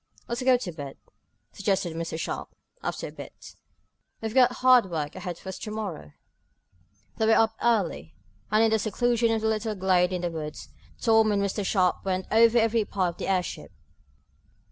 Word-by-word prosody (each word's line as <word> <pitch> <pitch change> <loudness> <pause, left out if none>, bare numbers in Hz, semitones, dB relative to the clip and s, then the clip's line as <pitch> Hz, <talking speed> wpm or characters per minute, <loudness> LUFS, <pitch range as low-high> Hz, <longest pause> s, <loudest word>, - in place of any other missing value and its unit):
"Let's 240 +2 -3
go 255 0 +4
to 205 -7 -5
bed," 145 -4 -8 0.5
suggested 190 -4 -1
Mr. 165 -1 -4
Sharp, - - -4 0.3
after - - -4
a - - -9
bit. - - -11 0.7
"We've 220 -1 -4
got 255 -1 +5
hard 250 -5 +5
work 155 -3 -3
ahead 180 -2 -5
of - - -19
us 190 0 -6
to - - -6
morrow." 205 - -6 1.0
They 220 - +1
were 225 - +5
up 220 0 +3
early, 190 - 0 0.3
and, 215 +2 +4
in 225 - +3
the 220 - +3
seclusion 230 +2 +1
of 225 -1 0
the - - +2
little 220 0 -1
glade 185 -1 +2
in 180 -1 -3
the 175 - -1
woods, 155 -2 -7 0.3
Tom 225 -2 +4
and 205 - +1
Mr. 200 +1 -2
Sharp 185 -2 +1
went 190 -1 -1
over 230 +1 +5
every 225 -1 +3
part 190 -3 -1
of - - -27
the - - -3
airship. 185 -2 -2
205 Hz, 185 wpm, -26 LUFS, 180-225 Hz, 1.0 s, got